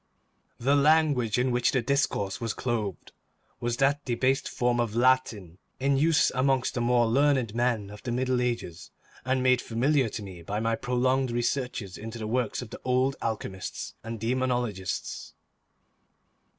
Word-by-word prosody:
The 135 +4 +3
language 145 -6 +3
in 125 +1 +1
which 120 0 +2
the 130 -3 +1
discourse 115 -6 0
was 115 -2 -2
clothed 110 -8 -3 0.5
was 120 0 -2
that 140 +2 +2
debased 130 +2 0
form 120 0 0
of 115 -2 -1
Latin 115 -8 +1 0.2
in 140 +1 +2
use 150 +2 +3
amongst 130 0 +1
the 120 - -2
more 120 0 +3
learned 130 -1 +2
men 115 -4 0
of 105 - -11
the 120 - -4
Middle 125 +1 0
Ages, 90 -9 -3 0.4
and 130 0 +1
made 130 -1 +4
familiar 130 +2 +1
to 105 - -6
me 95 -3 -9
by 100 +5 -3
my 115 +1 +1
prolonged 130 +2 +1
researches 120 -4 -2
into 115 +2 -7
the 110 - -5
works 120 +1 -1
of 115 - -12
the - - -9
old 130 +2 +1
alchemists 100 -5 -4
and 115 0 -6
demonologists. 120 -4 -2
120 Hz, 155 wpm, -27 LUFS, 115-130 Hz, 0.5 s, made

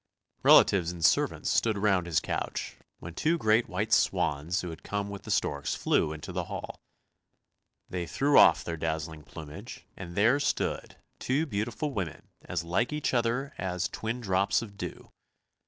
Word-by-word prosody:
Relatives 90 -4 +6
and 85 -2 -2
servants - - +2
stood 110 -3 +2
round 95 -4 +2
his 80 -3 +2
couch, - - -4 0.2
when 85 - -9
two 160 - +1
great 110 -3 +2
white 105 +4 -1
swans 80 +6 +1
who 90 - -5
had 80 - -10
come 100 0 -3
with 100 - -7
the - - -11
storks 70 -1 0
flew 75 - +1
into 80 -1 -7
the - - -3
hall. - - -7 1.1
They 90 -2 -4
threw 140 - +1
off - - +7
their 85 -1 -4
dazzling 80 -1 -3
plumage, 80 - -10
and 85 -2 -8
there 115 +8 +4
stood 140 - -1 0.2
two 140 +5 0
beautiful 120 +4 -3
women 90 -8 -5
as - - -3
like 90 - 0
each 150 -2 -1
other 125 +4 0
as 90 -1 -2
twin 115 +3 -4
drops 95 +1 +1
of 100 -3 -10
dew. - - -7
100 Hz, 165 wpm, -29 LUFS, 85-115 Hz, 1.1 s, off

